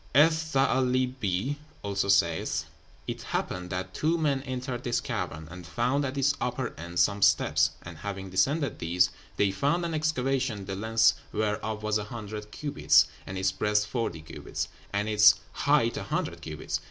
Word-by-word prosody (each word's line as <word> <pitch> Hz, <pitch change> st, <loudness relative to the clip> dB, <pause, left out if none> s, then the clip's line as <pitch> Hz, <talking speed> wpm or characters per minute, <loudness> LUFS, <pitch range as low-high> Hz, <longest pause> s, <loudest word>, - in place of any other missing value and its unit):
"Eth 155 Hz, +4 st, +7 dB, 0.2 s
Tha'álibee 130 Hz, -3 st, +1 dB, 0.3 s
also 100 Hz, -1 st, -1 dB
saith, 90 Hz, -5 st, +2 dB, 0.4 s
'It -, -, -4 dB
happened 90 Hz, 0 st, -3 dB
that 90 Hz, 0 st, -4 dB
two 160 Hz, +2 st, +1 dB
men 145 Hz, -4 st, +1 dB
entered 130 Hz, -2 st, -4 dB
this 120 Hz, -3 st, +1 dB
cavern, 80 Hz, +1 st, -4 dB
and 90 Hz, -2 st, -9 dB
found 125 Hz, +10 st, 0 dB
at 140 Hz, 0 st, -3 dB
its 140 Hz, +1 st, +3 dB
upper -, -, -2 dB
end 85 Hz, +2 st, -7 dB
some 100 Hz, +4 st, +3 dB
steps, -, -, +4 dB
and 85 Hz, -2 st, -9 dB
having 95 Hz, 0 st, -5 dB
descended 135 Hz, -, +1 dB
these, 85 Hz, +2 st, +2 dB, 0.3 s
they 100 Hz, -1 st, +3 dB
found 145 Hz, -, +1 dB
an 165 Hz, -, -2 dB
excavation, 135 Hz, -8 st, 0 dB
the 95 Hz, 0 st, -4 dB
length 110 Hz, +2 st, +4 dB, 0.2 s
whereof 110 Hz, 0 st, -2 dB
was 105 Hz, 0 st, +1 dB
a 105 Hz, -, -4 dB
hundred 105 Hz, -2 st, -7 dB
cubits, 75 Hz, -, +3 dB, 0.2 s
and 95 Hz, -, -5 dB
its 95 Hz, 0 st, +1 dB
breadth 105 Hz, +1 st, +1 dB
forty 110 Hz, -8 st, -3 dB
cubits, 80 Hz, -, -5 dB, 0.2 s
and 100 Hz, +1 st, -1 dB
its 105 Hz, -1 st, +7 dB, 0.2 s
height 140 Hz, -5 st, +2 dB
a -, -, -3 dB
hundred -, -, -2 dB
cubits. -, -, -4 dB
105 Hz, 165 wpm, -28 LUFS, 95-130 Hz, 0.4 s, Eth